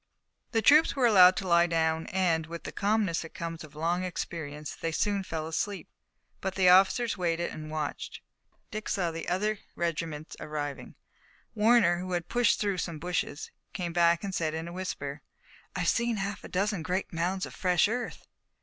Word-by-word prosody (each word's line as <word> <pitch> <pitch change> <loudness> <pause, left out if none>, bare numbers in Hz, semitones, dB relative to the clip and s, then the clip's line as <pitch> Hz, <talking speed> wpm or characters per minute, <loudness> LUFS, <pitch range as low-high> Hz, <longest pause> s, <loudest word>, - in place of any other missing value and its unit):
The 225 -2 +1
troops 300 +5 +6
were 265 -3 +2
allowed 185 -5 +8
to 190 - -3
lie 170 0 +5
down, 160 -1 0
and, 170 -4 +1
with 170 0 -7
the - - -6
calmness 205 -4 +1
that 165 - -10
comes 165 -1 -5
of 150 -1 -13
long 170 +4 0
experience, 155 -4 -5
they 165 - -3
soon 200 +4 0
fell 160 -4 -4
asleep. 195 +5 -3 0.5
But 190 -1 -3
the 185 -2 +5
officers 195 +4 +4
waited 170 -1 0
and 155 0 -7
watched, 155 -1 -4 0.3
and - - -41
Dick 215 -1 -5
saw 180 -4 0 0.2
other 205 +4 0 0.2
regiments 165 -2 -3
arriving. 145 -2 -5 0.6
Warner, 210 -5 +4
who 185 0 -4
had 175 -1 -2
pushed 245 -1 +3
through 200 -3 0
some 170 -2 -3
bushes, 165 -2 -3 0.2
came 175 -3 -3
back 170 0 +3
and 195 -1 -4
said 160 -3 -1
in 160 +1 -4
a 170 - -7
whisper: 150 -6 -5 0.5
"I've 180 -2 -1
seen 235 +2 +1
a - - -2
half 200 0 -3
dozen 200 0 -1
great 180 +3 -2
mounds 180 +3 -1
of - - -10
fresh 180 0 +3
earth." 245 +3 -4
175 Hz, 180 wpm, -29 LUFS, 165-200 Hz, 0.6 s, allowed